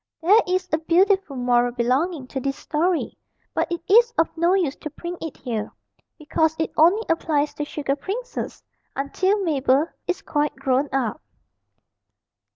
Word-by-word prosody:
There 410 +7 +6
is 370 0 0
a 315 - +3
beautiful 370 0 +2
moral 245 -1 +2
belonging 260 +6 0
to 270 - -3
this 275 +1 -2
story, 335 +3 -1 0.3
but - - -1
it 340 - -2
is 470 +4 +6
of 325 - +1
no 340 +3 +3
use 335 -8 0
to 305 - -6
print 345 +4 -7
it 320 -3 -6
here, 225 -5 -4 0.5
because 320 0 0
it 320 - -1
only 355 +8 +4
applies 300 -3 0
to 295 - -4
sugar 285 -2 -2
princes 470 - -5 0.3
until 375 +9 0
Mabel 280 -3 +2 0.2
is 365 - -2
quite 295 -1 -1
grown 265 +2 0
up. 270 +1 -1
315 Hz, 155 wpm, -23 LUFS, 275-360 Hz, 0.5 s, There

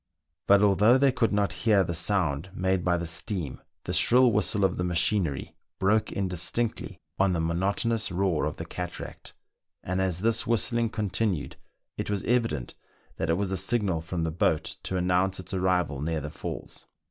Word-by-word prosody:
But 100 +1 +6
although 105 +5 +5
they 135 0 +4
could 120 -3 +1
not 100 -1 +1 0.2
hear 100 -3 +5
the 85 - -3
sound 85 -2 0
made 95 -1 0
by 90 -1 +2
the 85 - -3
steam, 85 -2 -2 0.2
the - - -4
shrill 125 0 +5
whistle 105 -1 +2
of 90 - 0
the 90 - -1
machinery 85 -3 0 0.2
broke 110 +3 +1
in 100 -1 -1
distinctly 95 +6 -2 0.2
on 95 -1 +3
the 85 - 0
monotonous 100 +7 0
roar 90 -5 0
of 75 - -4
the 80 - -5
cataract; 90 +1 -7 0.5
and 90 +1 -1
as 90 -2 0
this 115 +1 +2
whistling 115 0 +2
continued, 105 -6 -2 0.4
it - - -3
was 100 -2 -1
evident 115 - 0 0.4
that - - -2
it 80 - +3
was 100 -1 -2
a 95 - -1
signal 100 -9 0
from 85 +1 -3
the 80 - -1
boat 80 -1 0
to 95 - -2
announce 90 +1 +1
its 95 +1 -8
arrival 90 -7 0
near 80 +1 -1
the 75 0 -6
falls. - - -7
95 Hz, 180 wpm, -27 LUFS, 85-105 Hz, 0.5 s, But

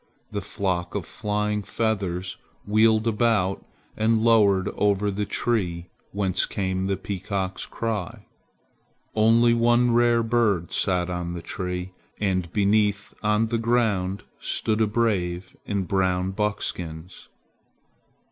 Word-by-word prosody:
The - - -3
flock 90 -2 -2
of 100 -5 -2
flying 105 0 -1
feathers 95 -5 -2 0.3
wheeled 110 +1 +3
about 110 -4 +1 0.3
and 110 +1 +2
lowered 105 -4 +4
over 105 0 +1
the 100 +1 -2
tree 90 -8 -1 0.2
whence 95 -2 0
came 95 -1 -2
the 95 0 0
peacock's 95 0 -3
cry. 110 -6 -4 0.9
Only 115 +2 +4
one 120 +1 +3
rare 120 0 +4
bird 110 -7 +1
sat 90 -2 0
on 90 -1 -3
the 85 -1 -6
tree, 90 0 -4 0.3
and 95 -4 0
beneath, 105 0 +1
on 105 +1 +2
the 115 -1 0
ground, 110 -5 +1 0.2
stood 110 0 0
a 110 - +4
brave 95 -5 -1
in 100 -2 0
brown 95 0 0
buckskins. 90 -4 -4
100 Hz, 120 wpm, -25 LUFS, 95-110 Hz, 0.9 s, lowered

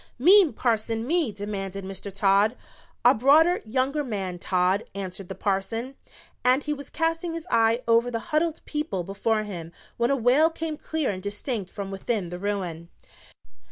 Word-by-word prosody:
"Me, 360 +5 +6
Parson, 225 -1 -1
me!" 320 -3 +2
demanded 195 -1 -5
Mr. 195 +1 -7
Todd. 200 +4 +3 0.5
"A - - +8
broader, 310 +9 +4
younger 265 +6 0
man, 195 -8 -4
Todd," 185 +3 +1
answered 190 -1 -6
the 190 - -5
parson, 210 +7 -2 0.5
and 255 +3 +3
he 300 - -1
was 280 -1 -9
casting 330 0 -1
his 330 0 -6
eye 230 +2 +3
over 230 +1 +4
the 235 - -2 0.2
huddled 320 +1 0
people 295 - -2
before 215 +4 -1
him 170 -6 -7 0.3
when 235 +1 +1
a 275 - +3
wail 265 +6 +4
came 325 -1 -4
clear 310 -4 -2
and 185 -1 -6
distinct 205 0 -3
from 200 -1 -6
within 195 -1 -2
the 180 +1 -6
ruin. 180 -5 -3
225 Hz, 160 wpm, -25 LUFS, 195-280 Hz, 0.5 s, A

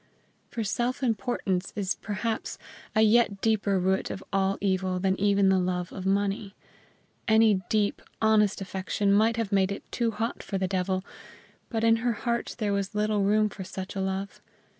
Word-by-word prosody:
For 230 - -3
self 240 +6 -1
importance 205 -5 -1
is 200 -2 0
perhaps 220 +2 -3 0.4
a 215 - +5
yet 220 -2 +4
deeper 210 -3 +1
root 190 +1 +1
of 190 - -6
all 195 0 +1
evil 185 -2 0
than 190 0 +1
even 200 -1 +3
the 190 -1 +4
love 180 -1 -2
of 190 -1 -4
money. 200 0 0 0.7
Any 220 -3 +5
deep, 210 -2 +1 0.2
honest 215 -2 +3
affection 195 +1 -1
might 220 +3 +3
have 225 -3 -2
made 195 -1 +2
it 200 - -5
too 235 -1 0
hot 225 +1 -3
for 195 - -3
the 190 0 0
devil, 185 0 -1 0.6
but 225 -2 -2
in 225 0 +5
her 235 +1 0
heart 235 +2 -2
there 210 -3 0
was 200 +1 -2
little 210 0 +1
room 215 +2 +3
for 195 -2 -7
such 190 +1 -7
a 195 - -1
love. 190 +1 -3
200 Hz, 175 wpm, -27 LUFS, 190-220 Hz, 0.7 s, a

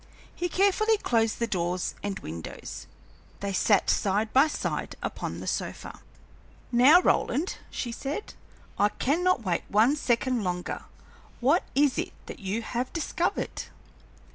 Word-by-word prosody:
He 355 - -2
carefully 405 +4 +3
closed 225 - +1
the 235 - 0
doors 180 -4 -1
and 200 -1 -3
windows. 80 +1 -7 0.5
They 200 -1 -3
sat 200 +1 +3
side 210 +2 +1
by 270 +4 +6
side 305 - -3
upon - - -4
the - - -6
sofa. - - -4 0.7
"Now, 260 +8 +7
Roland," 340 -1 +1
she 240 - -4
said, 280 - -5 0.5
"I 205 - +5
cannot 330 - +1
wait 175 -4 0
one 225 +8 +4
second 250 -4 +1
longer. 180 -1 -3 0.5
What 280 +8 +3
is 285 -1 +3
it - - -3
that - - -8
you 205 +3 -2
have 245 +3 -3
discovered?" 335 +1 -2
240 Hz, 135 wpm, -27 LUFS, 205-300 Hz, 0.7 s, Now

